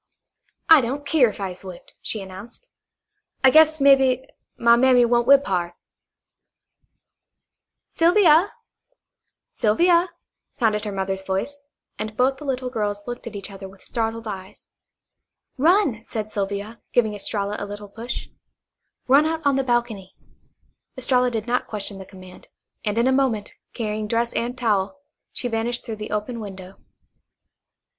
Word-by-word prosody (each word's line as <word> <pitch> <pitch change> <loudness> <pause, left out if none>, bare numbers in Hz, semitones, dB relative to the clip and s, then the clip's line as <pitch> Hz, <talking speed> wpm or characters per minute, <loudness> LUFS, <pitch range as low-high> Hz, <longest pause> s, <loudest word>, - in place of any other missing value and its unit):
"I 320 -3 +8
don't 270 +4 -4
keer 280 -6 +4
if 210 - -10
I 195 -2 -3
is 180 - -11
whipped," 185 -2 -11
she 215 -3 -3
announced. 200 - -11 0.8
"I 265 - +7
guess, 315 +1 +6
mebbe, 265 -2 +4 0.3
my 235 0 +5
mammy 250 0 +5
won't 240 0 +2
whip 280 +1 +6
hard." 175 -2 -1 2.1
"Sylvia, 345 +1 +4 1.0
Sylvia," 340 +11 +3 0.4
sounded 220 -5 0
her 210 - -3
mother's 190 0 -3
voice, 195 +10 -3 0.4
and 215 0 -5
both 265 +2 +2
the 300 - -9
little 255 -2 -2
girls 205 -3 -2
looked 245 0 -7
at - - -7
each 200 0 -7
other 195 -1 -9
with 195 0 -18
startled 225 0 -3
eyes. 190 -2 -8 0.9
"Run," 315 - +3
said 215 -2 -5
Sylvia, 200 +3 -4
giving 220 -3 +2
Estralla 205 0 -3
a - - -4
little 205 0 -8
push. 230 +4 -6 0.8
"Run 280 +4 +5
out 320 -1 -3
on 280 -1 +3
the 270 - +1
balcony." 235 -6 -2 0.8
Estralla 250 -1 +2
did 225 -3 -3
not 250 +1 -1
question 205 -2 -6
the 190 - -10
command, 185 -2 -14 0.4
and 210 +1 -2
in 235 - +3
a 260 - +3
moment, 260 -6 0 0.2
carrying 215 -2 -3
dress 235 +2 0
and 245 +2 -2
towel, 220 +2 0 0.3
she - - -6
had 245 - -1
vanished 230 +2 -2
through 225 -2 -5
the 215 0 -6
open 215 +3 -3
window. 190 -3 -9
230 Hz, 150 wpm, -23 LUFS, 205-260 Hz, 2.1 s, I